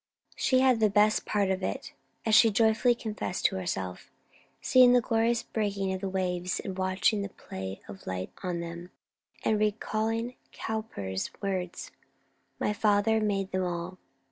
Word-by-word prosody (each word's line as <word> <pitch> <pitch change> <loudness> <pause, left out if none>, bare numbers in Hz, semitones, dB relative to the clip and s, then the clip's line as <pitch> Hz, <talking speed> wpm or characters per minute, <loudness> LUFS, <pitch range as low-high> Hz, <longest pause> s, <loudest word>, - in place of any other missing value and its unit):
She 255 -1 +3
had 260 -3 +4
the 215 -1 +4
best 210 +1 +3
of 195 -2 +1
it; - - -4 0.3
as 220 - +1
she 225 - +8
joyfully 225 +3 +3
confessed 215 -5 -4
to 190 - +3
herself, 95 - -4 0.5
seeing 250 -1 +6
the 250 - +6
glorious 230 0 +1
breaking 200 -3 -1 0.2
waves 180 -1 -1
and 190 - -5
watching 190 +3 +1
the 200 - -4
play 95 - -7
of 100 -1 -11
light 95 0 -4
on 180 -2 -2
them, 170 +1 -7 0.6
and 215 -1 +2
recalling 220 +2 -1 0.2
Cowper's 100 - -4
words 185 -3 -3 0.7
"My 210 - 0
Father 210 +1 +3
made 195 -2 -1
them 185 0 0
all!" 175 +1 -4
200 Hz, 145 wpm, -29 LUFS, 180-220 Hz, 0.7 s, she